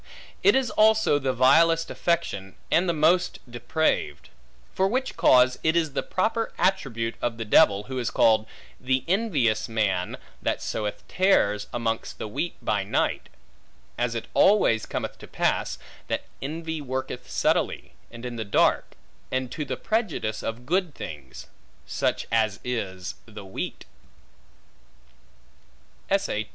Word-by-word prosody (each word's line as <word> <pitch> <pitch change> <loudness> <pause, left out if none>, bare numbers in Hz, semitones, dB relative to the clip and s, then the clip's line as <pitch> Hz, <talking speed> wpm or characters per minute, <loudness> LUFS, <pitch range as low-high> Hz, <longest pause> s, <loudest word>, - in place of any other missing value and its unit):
It 405 - +5
is 265 -3 +1
also 215 -8 +4
the 135 -1 0
vilest 165 +6 +4
affection, 100 - -1 0.2
and 175 +2 +3
the - - +4
most 170 +3 +2
depraved; 120 - -1 0.4
for 190 - +2
which 255 +5 -1
cause 125 0 +5
it 160 +1 +2
is 160 -4 +1
the - - 0
proper 220 +4 -1
attribute 135 -12 0
of 120 -1 -1
the 115 - -4
devil, 100 -1 +5
who 130 +3 -5
is 120 -2 -1
called, 110 -2 +3 0.3
the 130 0 0
envious 155 - +1
man, 100 -5 0 0.2
that - - -1
soweth 105 -1 -4
tares 105 - +2
amongst 115 -1 -2
the - - -5
wheat 170 +11 -3
by 105 -2 +1
night; 95 - -1 0.7
as 120 -1 -1
it 115 - -4
always 190 - +4
cometh - - -4
to - - -11
pass, - - 0 0.3
that - - -2 0.2
envy 160 +2 -4
worketh 130 -2 -5
subtilly, - - 0 0.2
and 115 +1 -10
in 120 -1 -5
the 110 - -2
dark, 100 - +2 0.4
and 130 -1 -2
to 155 - -3
the 145 - -4
prejudice 185 - -1
of 115 +2 -5
good 175 0 0
things, 70 -4 -8 0.4
such - - -1
as 110 -3 +1
is 95 -7 -4
the 105 -2 -10
wheat. 95 - -6
125 Hz, 140 wpm, -25 LUFS, 110-170 Hz, 0.7 s, It